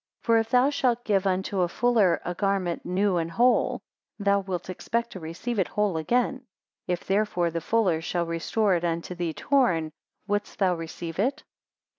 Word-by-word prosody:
For 230 -1 +4
if 225 0 -2
thou 250 +4 +4
shalt 245 -4 0
give 200 -2 +2
unto 190 +1 0
a 175 - +3
fuller 210 -4 +2
a 175 - -2
garment 195 -2 -1
new 185 +1 +1
and 165 -1 -1
whole, 240 +8 +2 0.3
thou 200 -1 +2
wilt 185 -3 -4
expect 235 +5 -2
to 190 - -7
receive 175 +8 -4
it 185 - +2
whole 210 -4 0
again; 245 +9 0 0.4
if 180 -1 -2
therefore 195 -4 +1
the 165 0 -3
fuller 185 -4 +1
shall 170 +1 -1
restore 175 +5 0
it 175 -1 0
unto 170 +1 -2
thee 175 -2 -3
torn, 180 - +2 0.3
wouldst 205 0 -2
thou 190 -3 +3
receive 165 0 -6
it? 270 +8 0
190 Hz, 175 wpm, -26 LUFS, 170-225 Hz, 0.4 s, For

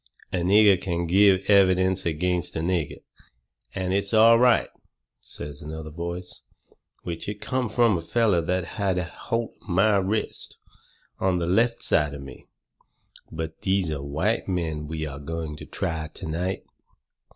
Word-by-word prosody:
"A - - +1
nigger 95 +2 +5
can 85 -2 -1
give 95 +2 +4
evidence 95 -2 +4
against 90 +2 -1
a 80 - -1
nigger, 85 -3 -2 0.7
and 95 0 -1
it's 100 +2 +1
all 115 +1 +7
right," 125 -1 +4 0.5
says 75 +1 -7
another 80 0 -7
voice 85 +2 -5 0.6
which 85 +3 -5
it 105 0 -5
come 130 0 -2
from 115 -2 +3
a 85 - -2
feller 100 0 +2
that 90 +1 -1 0.2
had 95 -2 +1
a 90 - 0
holt 115 +7 -4
of - - -17
my 100 +4 +4
wrist 100 +3 -2 0.6
on 95 -1 +1
the 85 - -1
left 115 +7 +3
hand - - -11
side 75 -3 +2
of 70 - -8
me 70 - -12 0.8
"but 80 0 -6
these 95 -4 +1
are 70 -2 -3
white 80 +11 -1
men 80 -5 -2
we 80 0 -3
are 70 -2 -6
going 80 +1 -5
to - - -10
try 80 -2 -3
to 90 - -6
night. 90 +4 -2
90 Hz, 160 wpm, -25 LUFS, 80-100 Hz, 0.8 s, all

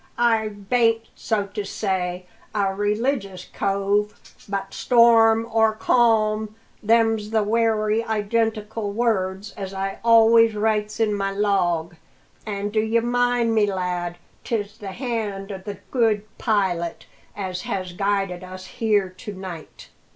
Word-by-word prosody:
"I 225 -2 +2
bain't, 225 +2 0
so 215 -3 -1
to 210 - -3
say, 185 -3 -2 0.3
a 195 -2 +1
religious 205 -2 -1
cove; 200 +1 -1 0.3
but, 195 -1 -3
storm 230 -2 +5
or 220 -1 +3
calm, 215 -2 +2 0.3
them's 225 -1 +2
the 220 -1 +1
wery 220 0 +1
identical 220 -1 -1
words 200 -3 -1
as 195 -1 -7
I 195 0 -3
always 230 -1 +6
writes 215 0 0
in 220 -2 +2
my 195 -1 -1
log. 185 -5 0 0.5
An', 205 -1 -3
d'ye 220 +2 +2
mind 245 0 +1
me, 210 -2 +2
lad, 180 -2 -3 0.3
'tis 210 -2 -3
the 200 -2 -6
hand 215 -5 -3
o' 190 - -5
the 200 +1 -7
Good 225 -5 +2 0.2
Pilot 185 -7 0 0.3
as 185 -2 -4
has 185 -2 -4
guided 195 -1 -1
us 185 0 -9
here 210 -1 +1
to 185 +3 -9
night." 185 -4 -9
210 Hz, 130 wpm, -23 LUFS, 195-225 Hz, 0.5 s, always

